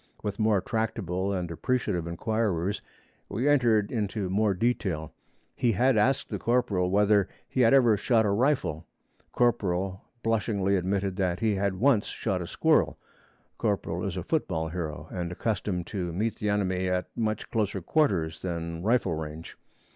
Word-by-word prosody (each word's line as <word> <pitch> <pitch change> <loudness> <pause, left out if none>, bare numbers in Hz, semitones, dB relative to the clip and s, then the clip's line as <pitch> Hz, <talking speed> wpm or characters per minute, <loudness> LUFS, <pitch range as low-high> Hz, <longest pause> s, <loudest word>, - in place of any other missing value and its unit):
With 105 0 -3
more 110 -3 +3
tractable 100 -4 -2
and 90 -3 -2
appreciative 90 -3 -1
inquirers 100 0 -1 0.5
we 115 +8 -1
entered 120 -8 +3
into 105 -4 -2
more 105 0 +2
detail. 90 -8 -1 0.4
He 120 -2 +2
had 125 +5 +3
asked 125 +5 +2
the 105 - -3
corporal 105 -7 +1
whether 100 0 +3 0.2
he 130 - 0
had 115 -2 +5
ever 120 -5 +5
shot 110 +1 +2
a 100 - +2
rifle: 115 - 0 0.4
corporal 95 -6 0 0.2
blushingly 105 -3 +1
admitted 95 +1 -1
that 90 -3 0
he 110 -2 +2
had 100 -1 0
once 120 +1 +3
shot - - -2
a - - -5
squirrel. - - +2 0.6
(Corporal - - -1
is - - -3
a - - -3
football 80 0 -1
hero, 80 -3 -5
and 90 -2 -3
accustomed 95 -2 -2
to 90 -3 -3
meet 105 +7 -1
the 105 - -1
enemy 95 -2 0
at 90 0 0
much 110 -2 -2
closer 105 -4 0
quarters 85 - +1
than 85 -2 -4
rifle 110 -3 +2
range. 80 0 -6
100 Hz, 155 wpm, -28 LUFS, 90-110 Hz, 0.6 s, had